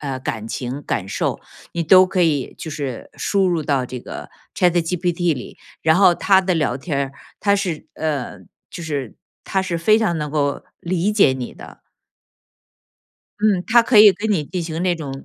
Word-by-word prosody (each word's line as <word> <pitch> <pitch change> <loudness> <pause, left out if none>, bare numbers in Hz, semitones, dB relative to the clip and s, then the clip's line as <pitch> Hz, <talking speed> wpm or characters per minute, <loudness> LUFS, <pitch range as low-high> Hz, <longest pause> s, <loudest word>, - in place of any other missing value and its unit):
呃， 135 -3 -4
感 110 -4 -4
情、 130 +4 -5
感 95 -8 -3
受， - - -2 0.3
你 170 - -1
都 185 +3 +7
可 185 0 -1
以 145 -5 0
就 160 - -6
是 140 -5 -5
输 195 -2 +1
入 170 -3 0
到 135 -4 0
这 125 - -6
个 - - -9 0.3
ChatGPT 175 0 +1
里， 125 - -9 0.3
然 160 +1 +4
后 185 -2 +6
它 190 +2 +3
的 185 -1 0
聊 150 -6 0
天 145 +3 -5
儿， 135 -1 -2 0.3
它 200 -1 +3
是， 180 -6 -3
呃， 150 -5 -3 0.3
就 175 - -8
是 145 -7 -4 0.3
它 190 -1 0
是 175 -3 -2
非 215 +6 +4
常 215 -7 0
能 150 -1 -4
够 145 -2 -1 0.2
理 185 +3 0
解 200 -10 +4
你 130 -2 -6
的。 - - -13 1.6
嗯， 205 -4 +2
它 235 +1 +5
可 230 -2 +4
以 210 -2 +9
跟 220 +3 -3
你 175 -8 +1
进 175 +3 -4
行 160 0 -4
那 180 -1 +2
种， 140 -5 -7
165 Hz, 220 characters per minute, -20 LUFS, 140-185 Hz, 1.6 s, 以